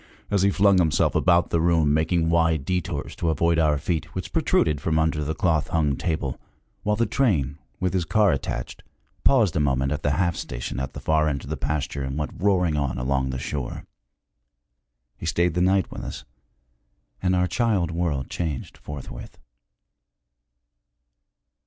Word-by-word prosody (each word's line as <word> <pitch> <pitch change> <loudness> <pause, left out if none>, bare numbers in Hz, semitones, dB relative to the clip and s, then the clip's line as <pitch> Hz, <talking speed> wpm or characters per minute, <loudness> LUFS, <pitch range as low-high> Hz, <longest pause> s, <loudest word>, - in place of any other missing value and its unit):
as 100 -2 +2
he 100 - +4
flung 100 -1 +4
himself 80 -4 +2
about 90 -1 +3
the 85 - +2
room, 80 -3 +3
making 80 +2 +1
wide 80 -3 +2
détours 90 -1 -2
to 85 - -1
avoid 85 +2 +2
our 75 -2 +3
feet, 80 +2 -3
which - - -5
protruded 75 -3 +2
from 80 +1 0
under 80 -1 +1
the 80 +2 -2
cloth 80 -4 +1
hung 75 -4 +1
table, 75 -4 -2 0.4
while 105 +1 +1
the 115 +2 +1
train, 85 - 0 0.2
with 90 0 0
his 95 -2 +1
car 105 +4 +3
attached, - - -4 0.4
paused 115 - +4
a - - +2
moment 70 -2 +1
at 75 0 -2
the 70 -1 +1
'half 85 +1 +1
station' - - -5
at 65 0 -4
the - - -7
far 80 0 +2
end 70 -3 -2
of 70 - -8
the - - 0
pasture 70 0 -2
and 65 +1 -3
went 75 -1 -2
roaring 90 -4 +2
on 70 -4 -1
along 65 +1 0
the 65 - -3
shore. 70 0 -4 1.3
He - - -6
stayed 85 -1 +1
the 90 - 0
night 95 +1 +2
with - - -6
us, - - -7 1.0
and 90 0 +2
our 90 0 +2
child 100 -5 +1
world 80 -6 -1
changed 75 -7 -4
forthwith. 65 -4 -9
80 Hz, 170 wpm, -24 LUFS, 70-90 Hz, 1.3 s, he